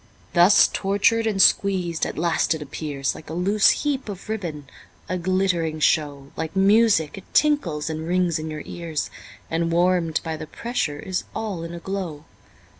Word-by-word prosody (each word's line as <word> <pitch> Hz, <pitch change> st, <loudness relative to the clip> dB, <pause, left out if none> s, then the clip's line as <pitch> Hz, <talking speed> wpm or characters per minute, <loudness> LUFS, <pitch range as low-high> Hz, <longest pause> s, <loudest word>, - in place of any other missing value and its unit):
Thus 175 Hz, +3 st, +6 dB
tortured 205 Hz, +3 st, +1 dB
and 205 Hz, -3 st, -1 dB
squeezed, 185 Hz, -4 st, +3 dB
at -, -, -7 dB
last 165 Hz, 0 st, +1 dB
it 155 Hz, -, -7 dB
appears 140 Hz, -1 st, -3 dB
Like 155 Hz, -, -12 dB
a 160 Hz, -, -5 dB
loose 195 Hz, +4 st, +3 dB, 0.2 s
heap 275 Hz, -5 st, -1 dB
of 195 Hz, +1 st, -8 dB
ribbon, 170 Hz, -9 st, -4 dB, 0.4 s
a 185 Hz, -, -2 dB
glittering 175 Hz, -3 st, 0 dB
show, 145 Hz, -3 st, 0 dB
Like 160 Hz, +2 st, -4 dB
music 195 Hz, -4 st, +3 dB
it -, -, -21 dB
tinkles 195 Hz, -, +2 dB
and 160 Hz, 0 st, -4 dB
rings 175 Hz, -2 st, +1 dB
in 155 Hz, 0 st, -5 dB
your 155 Hz, -1 st, -6 dB
ears, 165 Hz, -4 st, -4 dB, 0.4 s
And 165 Hz, +1 st, 0 dB
warm'd 175 Hz, -2 st, +2 dB
by 160 Hz, -1 st, -4 dB
the 155 Hz, -, -7 dB
pressure 160 Hz, -8 st, -3 dB
is 185 Hz, +5 st, -3 dB
all 205 Hz, -6 st, -3 dB
in 170 Hz, +1 st, -6 dB
a -, -, -6 dB
glow. 170 Hz, -5 st, -5 dB
170 Hz, 170 wpm, -23 LUFS, 160-195 Hz, 0.4 s, Thus